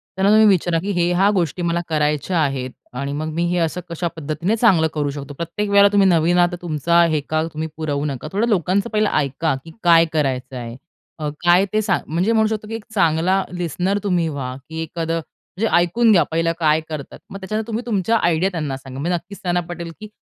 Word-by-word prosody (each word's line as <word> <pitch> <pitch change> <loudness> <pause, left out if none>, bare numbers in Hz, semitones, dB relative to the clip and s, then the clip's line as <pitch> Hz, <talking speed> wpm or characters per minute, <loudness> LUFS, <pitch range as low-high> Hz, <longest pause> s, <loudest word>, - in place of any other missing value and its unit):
त्यांना 190 +2 +2
तुम्ही 215 0 +6
विचारा, 175 -4 +2
की 195 +5 -3
हे 175 -2 +1
ह्या 190 +3 +3
गोष्टी 175 -1 -1
मला 170 0 0
करायच्या 150 +3 0
आहेत. 135 -4 -1 0.2
आणि 140 +3 -4
मग 155 0 -3
मी 170 +2 -1
हे 180 - 0
असं 170 +1 -1
कशा 170 +1 -2
पद्धतीने 160 +6 -2
चांगलं 195 -9 +4
करू 145 -2 -1
शकतो. 140 0 -7
प्रत्येक 170 +7 -4
वेळेला 200 0 +6
तुम्ही 200 -1 +4
नवीन 170 0 +3
आहात, 175 0 +4
तर 175 - -5
तुमचा 170 0 +2
हेका 155 +1 -1
तुम्ही 155 +1 -3
पुरवू 145 -3 -2
नका. 140 -1 -4
थोडं 215 +4 +1
लोकांचं 195 +2 +1
पहिलं 215 -1 +1
ऐका, 145 +1 0
की 165 - -10
काय 170 -1 +6
करायचंय? 130 -5 -2 0.4
अ, 150 -1 -2 0.2
काय 175 +2 +5
ते 215 - +2
सांग 195 -4 0
म्हणजे 175 +8 0
म्हणू 220 -1 +3
शकतो, 215 -1 -4
की 225 - -5
एक 225 - -7
चांगला 180 +2 +2
लिसनर 180 +3 -1
तुम्ही 180 -4 +1
व्हा, 135 -4 -4
की 160 0 -5
एखादं 165 0 -3 0.4
म्हणजे 225 +3 +1
ऐकून 185 +7 +3
घ्या 185 -5 +5
पहिला 165 +1 +1
काय 155 -1 +3
करतात? 150 -3 -7
मग 195 - -7
त्याच्या 195 +3 -4
नंतर 220 0 -3
तुम्ही 230 +1 -3
तुमच्या 225 -1 +1
आयडिया 170 0 +1
त्यांना 150 -6 -3
सांगा. 130 0 -9
म्हणजे 175 +5 0
नक्कीच 175 +4 -8
त्यांना 175 -1 0
पटेल, 170 -1 -6
की 215 - -8
170 Hz, 215 wpm, -20 LUFS, 155-195 Hz, 0.4 s, तुम्ही